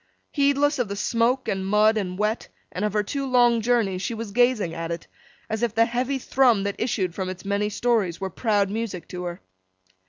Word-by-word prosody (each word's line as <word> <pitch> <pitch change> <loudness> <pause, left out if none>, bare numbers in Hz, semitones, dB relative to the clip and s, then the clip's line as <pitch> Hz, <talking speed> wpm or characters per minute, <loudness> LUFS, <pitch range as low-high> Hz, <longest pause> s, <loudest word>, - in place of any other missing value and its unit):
Heedless 285 0 +2
of 245 - +1
the 200 - -4
smoke 235 +5 +1
and 190 -1 -1
mud 210 +3 +4
and 185 -4 -2
wet, 210 +2 -1 0.2
and 180 - -4
of 210 -1 0
her 210 -1 +1
two 275 +7 -3
long 245 -3 +3
journeys, 220 -6 +1
she 230 - -3
was 225 -2 -6
gazing 240 -6 +2
at 165 0 -4
it, 170 0 -4 0.4
as 220 0 -3
if 235 -3 0
the 230 +1 +5
heavy 250 +4 -1
thrum 250 -5 +3
that 200 0 -1
issued 195 -7 -1
from 185 0 -3
its 185 +1 -8
many 200 +1 0
stories 210 -6 0
were 190 -1 -4
proud 205 -1 +1
music 215 -5 -4
to 180 0 -5
her. 175 0 -6
215 Hz, 210 wpm, -24 LUFS, 195-240 Hz, 0.4 s, the